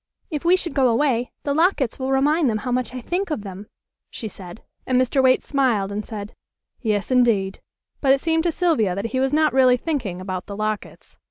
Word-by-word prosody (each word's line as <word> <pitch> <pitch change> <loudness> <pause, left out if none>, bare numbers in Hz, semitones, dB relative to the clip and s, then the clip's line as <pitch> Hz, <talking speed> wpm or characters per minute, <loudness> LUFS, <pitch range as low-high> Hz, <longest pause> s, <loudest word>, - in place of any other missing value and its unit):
"If 300 -2 -3
we 345 +2 +5
should 340 -5 -4
go 265 -2 +3
away 245 0 +1
the 285 - 0
lockets 315 - +1
will 260 0 -2
remind 290 +2 +3
them 215 - 0
how 250 - -1
much 250 -2 -1
I 255 - -5
think 365 +8 -2
of 295 -10 -3
them," 195 +1 -8 0.4
she 225 - -6
said, 185 -1 -11 0.2
and 255 -1 +3
Mr. 255 +1 +2
Waite 260 -1 +4
smiled 240 -9 +1
and 210 +1 -3
said: 210 -1 -7 0.5
"Yes, 210 -1 -1
indeed," 225 -7 +2 0.4
but 270 - +3
it 275 - +4
seemed 325 +2 +1
to 340 - +2
Sylvia 300 - +1
that 200 +4 -3
he 260 - +1
was 265 0 +1
not 310 0 +2
really 255 -1 +5
thinking 245 - -3
about 185 -1 -5
the 200 -1 -7
lockets. 215 0 -5
255 Hz, 210 wpm, -22 LUFS, 210-285 Hz, 0.5 s, we